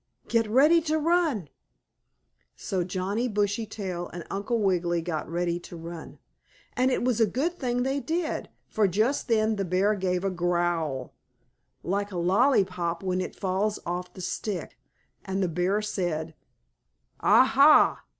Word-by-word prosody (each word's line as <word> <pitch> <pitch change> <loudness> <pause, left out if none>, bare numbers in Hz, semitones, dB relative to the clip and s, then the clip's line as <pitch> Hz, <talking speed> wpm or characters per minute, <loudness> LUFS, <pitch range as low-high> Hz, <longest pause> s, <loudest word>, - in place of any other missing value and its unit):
Get 230 -1 +1
ready 300 +9 +5
to 315 0 0
run!" 315 - +1 1.1
So 185 -2 -2
Johnnie 190 +6 -2
Bushytail 205 -4 -2
and 175 -2 -8
Uncle 205 +4 -1
Wiggily 175 -4 +1
got 160 -3 -4
ready 175 0 -1
to 175 - -11
run. 165 0 -9 0.6
And 255 +1 +2
it 255 - 0
was 245 -2 +1
a 225 - +5
good 325 - -2
thing 245 -2 0
they 270 +2 0
did, 325 +2 -2 0.2
for 215 -2 +2
just 215 +12 0
then 220 -2 +2
the 195 - 0
bear 190 +3 +2
gave 185 -2 -1
a 195 - 0
growl, 175 -5 -1 0.7
like 200 +2 -2
a 185 - -5
lollypop 180 -3 +1
when 185 -1 0
it 185 - -5
falls 200 +2 -1
off 180 +1 -4
the 185 - -8
stick, 195 +1 -4 0.5
and 190 0 -2
the - - +1
bear 180 +5 0
said: 170 -6 -2 0.9
"Ah, - - +6
ha! - - +5
195 Hz, 150 wpm, -27 LUFS, 175-230 Hz, 1.1 s, Ah